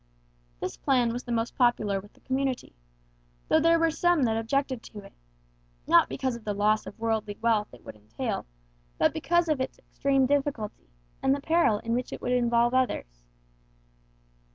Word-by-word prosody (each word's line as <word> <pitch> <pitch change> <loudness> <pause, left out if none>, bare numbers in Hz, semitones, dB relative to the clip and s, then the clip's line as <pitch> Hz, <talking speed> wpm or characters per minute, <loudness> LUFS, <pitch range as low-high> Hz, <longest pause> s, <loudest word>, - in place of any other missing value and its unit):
This - - -4
plan 245 -4 +2
was 245 - -5
the 240 - -5
most 230 0 -1
popular 215 -6 +2
with 205 +1 -15
the - - -25
community; 265 -1 -2 0.7
though 315 - +4
there 330 +1 +4
were 330 0 +2
some 345 -1 +2
that 225 -2 +2
objected 260 +2 -1
to 210 -2 -10
it, 195 - -15 0.7
not - - +5
because 240 - -2
of 235 - -10
the 210 -1 -3
loss 215 +1 +1
of - - -9
worldly 220 -2 -2
wealth 225 -3 +1
it 125 - -16
would - - -9
entail, 105 - -5 0.5
but - - +3
because 345 +2 +1
of 305 -4 0
its 260 - -4
extreme 275 -1 0
difficulty, 270 - -2 0.3
and 270 +1 +3
the - - -4
peril 320 -7 +2
in 230 +2 -3
which 250 +1 -2
it - - -6
would 245 - -3
involve 240 -1 +2
others. - - -1
240 Hz, 175 wpm, -27 LUFS, 215-275 Hz, 0.7 s, not